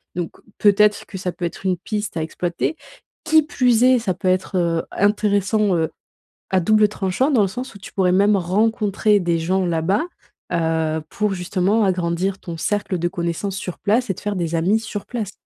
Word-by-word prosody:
donc 175 -2 -3 0.3
peut-être 210 0 +4
que 190 - -8
ça 180 -1 -3
peut 175 - -5
être 170 +3 -6
une 185 -1 +1
piste 205 -1 -4
à - - 0
exploiter, 170 - -2 0.5
qui 315 -1 +4
plus 250 -5 +2
est, 255 0 +6
ça 210 -5 -1
peut 185 - -4
être, 185 +1 +1
heu, 170 -2 +1
intéressant, 205 0 +2
heu, 160 -1 0 0.6
à 190 - +5
double 215 +4 +4
tranchant, 210 +8 0
dans 245 - +4
le 200 - +3
sens 245 +5 -7
où 200 - -11
tu - - -11
pourrais 185 -2 +2
même 200 +2 +4
rencontrer 210 +2 +1
des 170 -2 0
gens 185 +3 0
là-bas, 170 - +1 0.5
heu, 160 -1 0
pour 210 -1 -1
justement 190 +4 +1
agrandir 185 0 0
ton 170 -2 -7
cercle 205 +2 -1
de 175 0 0
connaissances 175 +3 -3
sur 180 -3 -5
place 225 +3 +1
et - - +2
te - - -11
faire 205 0 -2
des 170 -1 -2
amis 190 +7 +2
sur 205 -2 -6
place. 220 -5 -4
195 Hz, 195 wpm, -21 LUFS, 175-210 Hz, 0.6 s, est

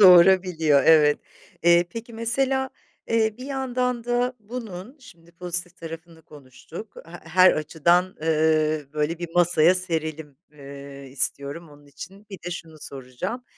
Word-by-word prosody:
Doğurabiliyor, 180 -5 +6
evet. 150 -2 +5 0.4
Eee, 170 0 +5
peki, 230 +3 -8
mesela, 265 +4 0 0.4
eee, 220 -1 +1
bir 255 - -8
yandan 250 -3 -2
da 245 +1 0
bunun, 220 0 -8
şimdi, 170 -9 -18
pozitif 175 0 -1
tarafını 165 0 -10
konuştuk, 150 - -12
he 165 - -13 0.2
her 185 +2 +6
açıdan, 165 +3 +2 0.2
ııı, 155 -2 +1
böyle 155 +2 -1
bir 175 0 -5
masaya 175 0 +4
serelim, 160 -5 -3 0.2
ııı, 140 -1 -11
istiyorum. 140 +4 -1
Onun 145 -1 -18
için, 190 +9 -12
bir 195 - -8
de - - -3
şunu 165 -2 -8
soracağım: 140 - -6
170 Hz, 135 wpm, -24 LUFS, 155-210 Hz, 0.4 s, Doğurabiliyor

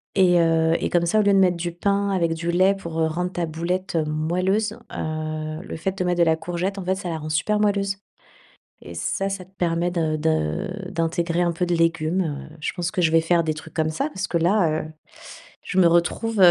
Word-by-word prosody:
et, 180 -2 +5
heu, 165 -1 +3
et - - -1
comme 170 -1 +2
ça 215 +5 +3
au - - +4
lieu 200 0 +4
de - - +5
mettre 180 -2 +3
du 170 0 -3
pain 200 +3 0
avec 170 -3 +1
du 170 +1 -2
lait 185 +3 +4
pour, 170 -4 -6
heu, 160 - +3
rendre 180 +3 -2
ta 175 -2 -2
boulette 170 +3 -2
moelleuse, 185 +8 0 0.2
heu, 155 0 -4
le - - -7
fait 190 +4 -3
de - - 0
mettre 175 -1 0
de - - +6
la 160 -1 +3
courgette, 175 +4 -3
en 195 - -4
fait, 190 - +2
ça 190 -2 -5
la 160 - -2
rend 155 0 -6
super 210 +7 +1
moelleuse. 200 -2 +1 0.8
Et 85 - -10
ça, 195 - -1
ça 195 -2 -4
te 185 - -26
permet 170 0 0
de 160 -3 0
de 160 - -1
d'intégrer 170 +1 0
un 175 - +1
peu 170 +2 -1
de 175 - +1
légumes, 165 +1 +1 0.3
heu. - - -15
Je - - -2
pense 175 -1 -2
que - - -1
je 160 - +4
vais 165 0 +5
faire 170 +1 +2
des 155 -1 -1
trucs 155 +1 -10
comme 155 -1 +1
ça 275 - -1
parce 190 -5 -4
que 170 - -2
là, 170 -2 +2
heu, - - -7 0.8
je 190 - -3
me 180 - +6
retrouve, 175 +6 +1
heu, 180 -2 +9
170 Hz, 240 wpm, -23 LUFS, 160-190 Hz, 0.8 s, heu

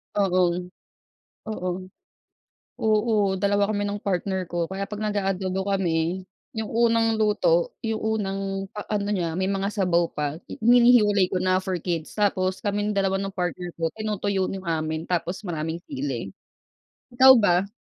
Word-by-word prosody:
Oo. 180 -3 +2 0.9
Oo. 185 -4 -3 1.1
Oo, 215 -3 +2
dalawa 200 +1 +2
kami 205 -1 -1
ng 205 0 -4
partner 190 -1 -1
ko. 175 -1 -1
Kaya 190 +2 -4
'pag 210 - -6
nag-a-adobo 195 -2 -1
kami, 175 -1 0 0.3
yung 220 -1 -2
unang 230 0 +2
luto, 205 -6 +2
yung 225 -1 -2
unang 195 -3 -2
pa 210 - -5
ano 205 -1 0
niya, 175 -4 -1
may 190 0 0
mga 195 0 -1
sabaw 180 -5 +1
pa, 150 -1 -2 0.2
i - - -7
hinihiwalay 225 -5 +5
ko - - 0
na 185 0 +2
for 185 -1 -2
kids, 165 -2 -3
tapos 190 -3 +1
kaming 205 0 -1
dalawa 195 -1 +1
ng 195 0 -3
partner 180 -2 -3
ko, 165 - +1
tinutuyo 205 -3 -1
no'ng 190 -1 -6
amin, 160 0 -2
tapos 175 +1 -1
maraming 160 0 -3
sili. 130 -8 -4 0.8
Ikaw 260 +2 +8
ba? 185 -2 +3
195 Hz, 150 wpm, -25 LUFS, 180-210 Hz, 1.1 s, Ikaw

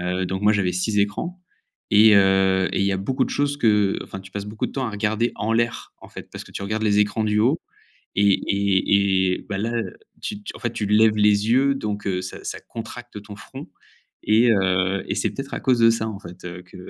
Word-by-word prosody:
heu, 90 +1 -1
donc 95 +2 -4
moi, 105 +1 +5
j'avais 100 -4 +1
6 105 +4 -1
écrans 105 - -2 0.5
et 105 +1 +7
heu 95 -1 +3
et - - 0
il 100 - +2
y 100 - +1
a - - 0
beaucoup 130 +8 -1
de - - -6
choses 145 0 0
qu'enfin, 105 -5 +1
tu 95 0 -14
passes 100 0 -5
beaucoup 105 +1 -4
de - - -10
temps 135 -2 -2
à - - -3
regarder 110 +3 -1
en 110 +2 -1
l'air, 115 +1 -1
en - - -13
fait, - - -11
parce - - -8
que - - -16
tu - - -6
regardes 110 +2 -2
les 105 -1 +3
écrans 105 +1 0
du 105 0 +1
haut 135 +9 +2 0.6
et 100 0 +4
et 100 -1 +2
et - - -12
bah, 100 -2 -3
là, 115 +4 -2
heu, 115 - -4 0.3
tu 210 - -4
t 205 - -7
en - - -14
fait, 120 - -2
tu 105 - -3
lèves 110 +1 +4
les 105 +1 +3
yeux 135 +3 +3
donc 105 -6 -4
heu, 90 -1 -1
ça, 95 - -8
ça - - -5
contracte 120 -1 -9
ton 105 0 -10
front - - -10 0.6
et 115 +3 +4
heu, 95 -1 +1
et - - -1
c'est - - 0
peut-être 135 0 -7
à - - -3
cause 125 -3 +2
de 115 0 +6
ça, 115 -1 -1
en 105 -3 -6
fait, 90 -2 -12
heu, 90 0 -7
que 90 - -15
105 Hz, 245 wpm, -22 LUFS, 95-115 Hz, 0.6 s, et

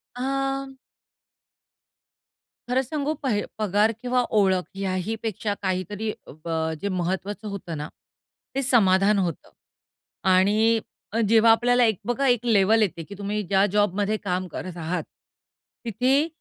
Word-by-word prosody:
अं, 270 +1 -2 2.0
खरं 255 +2 +2
सांगू 295 +2 -2
पह 235 -7 +1 0.2
पगार 210 +1 +2
किंवा 250 0 +1 0.2
ओळख 190 -2 +3
ह्याही 195 +2 -2
पेक्षा 215 -1 -2
काहीतरी 190 +3 -2
अ, - - -14
ब 170 - -4 0.3
जे 200 - -1
महत्त्वाचं 190 +4 -3
होतं 190 -5 -5
ना, 150 +1 -4 0.7
ते 275 - +1
समाधान 205 -5 +4
होतं. 175 -5 -3 0.7
आणि 210 +5 +4 0.5
जेव्हा 225 0 +6
आपल्याला 245 +2 +4
एक 220 -4 +1
बघा, 255 +4 0
एक 245 -1 +2
लेव्हल 220 0 +4
येते 170 -5 0
की 200 +5 -10
तुम्ही 205 +1 -2
ज्या 195 +1 +4
जॉबमध्ये 205 +1 +1
काम 185 -1 -1
करत 180 +1 -6
आहात, 165 0 -2 0.8
तिथे 255 +7 +2
210 Hz, 130 wpm, -24 LUFS, 190-240 Hz, 2.0 s, जेव्हा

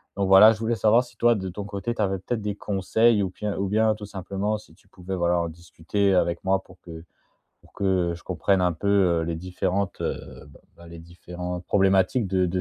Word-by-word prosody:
Donc 100 -1 -1
voilà 95 +3 +8
je 110 - -9
voulais 115 +1 -1
savoir 115 +2 +3
si 120 -2 -18
toi, 120 0 +4
de 95 -3 -4
ton 100 +3 -7
côté, 105 +3 -4
tu - - -3
avais 95 -2 0
peut-être 110 +4 -3
des 105 -1 -3
conseils 105 +3 +1
ou 95 - -2
bien 105 +2 -5
ou 100 +1 -1
bien 110 +1 +2
tout 105 -1 -9
simplement 100 +2 -3
si 105 -6 -17
tu 100 - -28
pouvais, 95 +1 -6
voilà, 85 -1 +1
en 85 -1 -2
discuter 85 +4 -2
avec 85 -1 0
moi 95 0 +1
pour 90 0 -19
que 80 -2 -10 0.6
pour - - -24
que, - - -6 0.3
heu, - - -4
je 85 - -14
comprenne 95 -2 0
un 90 -1 +1
peu, 85 +5 -5 0.3
heu, - - -2
les 85 0 -3
différentes, 90 +3 -3
heu, - - -6
b 70 - -17 0.2
bah, 85 - -14
les 85 0 -11
différentes 90 +1 -7
problématiques 95 +3 +2
de 95 -1 +1
de 90 +2 -2
95 Hz, 235 wpm, -24 LUFS, 90-105 Hz, 0.6 s, voilà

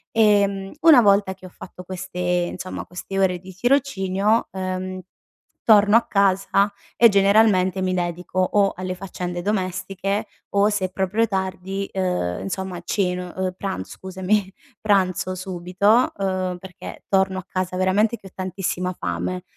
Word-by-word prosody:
Ehm, 200 -3 +3
una 320 -6 +8
volta 200 -2 +3
che 185 0 -15
ho - - -12
fatto 180 +1 -11
queste, 185 0 -7
insomma, 180 +1 -2
queste 185 +2 -7
ore 185 -2 +2
di 185 +1 -12
tirocinio, 215 -3 +1
ehm, 185 0 -4 0.6
torno 210 -1 +6
a 230 - +1
casa 200 0 +2 0.3
e 235 - +7
generalmente 195 -2 +3
mi 185 0 0
dedico 175 +1 -3
o 195 +2 +2
alle 185 0 -4
faccende 180 -1 -5
domestiche 190 0 -2 0.3
o, 200 +1 +4
se 205 -3 0
è - - -3
proprio 195 +5 0
tardi, 190 0 -3
uhm, 180 - -1
insomma 190 -2 -4
ceno 180 -1 -2
uhm, 185 -1 -2
pranz 95 - -4
scusami, 190 +1 -1 0.3
pranzo 185 -3 +1
subito, 185 +6 +1
uhm, 185 -2 -1
perché 185 0 -10
torno 190 -1 +2
a 185 - -10
casa 185 -1 -3
veramente 205 +5 +2
che 195 - -14
ho 185 - -14
tantissima 185 -1 -3
fame. 90 +1 -3
190 Hz, 145 wpm, -22 LUFS, 185-200 Hz, 0.6 s, una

